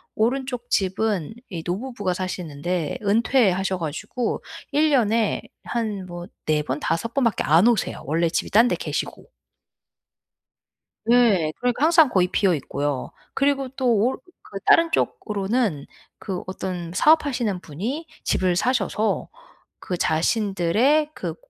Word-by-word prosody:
오른쪽 250 +1 -1
집은 195 -2 0 0.2
이 170 -4 -5
노부부가 205 0 -2
사시는데 175 -3 -3
은퇴하셔 200 -3 +2
가지고 170 - -3 0.3
1 300 +2 +3
년에 230 -4 +2 0.2
한 215 -5 -3
뭐 175 0 -8 0.2
4 155 -1 +2
번, 140 0 -3
5 165 +10 -1
번밖에 235 -7 +1
안 165 +8 +5
오세요 235 -4 0
원래 165 +4 +1
집이 - - -2
딴 225 +4 +6
데 - - +1
계시고. - - -4 1.9
예. 210 -10 +4
그러니까 245 +3 0
항상 325 -2 +6
거의 185 -6 +2
비어 195 -1 +2
있고요. 140 -2 -3 0.2
그리고 275 -1 +1
또 260 0 -3
올 235 +6 +1 0.4
그 - - -3
다른 330 0 +5
쪽으로는 205 - -1 0.4
그 190 -4 -5
어떤 180 -2 -5
사업하시는 250 - +3
분이 220 - -5 0.2
집을 185 -1 +2
사셔서 220 0 0 0.5
그 180 - -4
자신들의 210 - +2
그 - - -5
205 Hz, 250 characters per minute, -23 LUFS, 175-245 Hz, 1.9 s, 딴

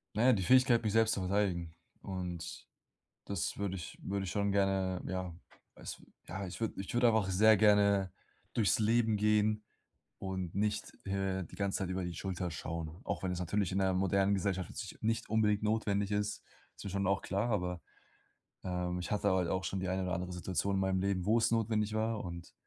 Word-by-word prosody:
Na 110 +3 +2
ja, 130 - +7
die 95 - +1
Fähigkeit, 125 +2 +5
mich 105 - 0
selbst 115 0 +4
zu 100 - -3
verteidigen. 90 -4 0 0.3
Und 90 -3 -5 0.6
das 100 -4 -2
würde 100 -2 -2
ich 85 -3 -7
würde 100 0 -2
ich 85 - -4
schon 100 -1 +1
gerne 95 -2 +1
ja, 95 -2 -3 0.4
weiß - - -8 0.3
ja, 95 +3 -4
ich 90 +3 -7
würde 115 - -1
ich 100 - -7
würde 120 0 +4
einfach 110 -4 +3
sehr 105 +3 +6
gerne 100 -2 +4 0.4
durchs 110 -2 +2
Leben 110 0 +3
gehen 105 0 +2 0.6
und 95 -3 -4
nicht, 105 +1 -1
äh, 95 -1 -1
die - - -13
ganze 100 -1 -1
Zeit 95 -3 -2
über 95 0 -2
die 90 -1 -4
Schulter 90 0 -3
schauen. 80 +1 -5
Auch - - -3
wenn 90 -1 -1
es 90 - -3
natürlich 90 +2 0
in 95 - 0
der 95 -1 +2
modernen 95 +1 +2
Gesellschaft 95 -2 -1
jetzt - - -6
nich - - -20
nicht 115 +1 0
unbedingt 105 -1 +2
notwendig 105 -2 +1
ist, 105 0 -1 0.3
ist - - -10
mir 100 - -4
schon 100 0 -1
auch 100 0 +1
klar, 100 +5 -1
aber, 90 -4 -1 0.8
ähm, 90 -1 -2
ich 90 - -5
hatte 105 - +2
halt 90 -2 +2
auch 95 +2 -1
schon 95 - -2
die 95 - -2
eine 95 +1 0
oder 90 -1 -2
andere 90 +1 -3
Situation 90 +2 -1
in 95 - +1
meinem 95 -1 +1
Leben, 95 -2 0
wo's 110 +2 +3
notwendig 110 -2 +1
war. 110 0 0
Und 85 -1 -7
95 Hz, 205 wpm, -33 LUFS, 90-105 Hz, 0.8 s, ja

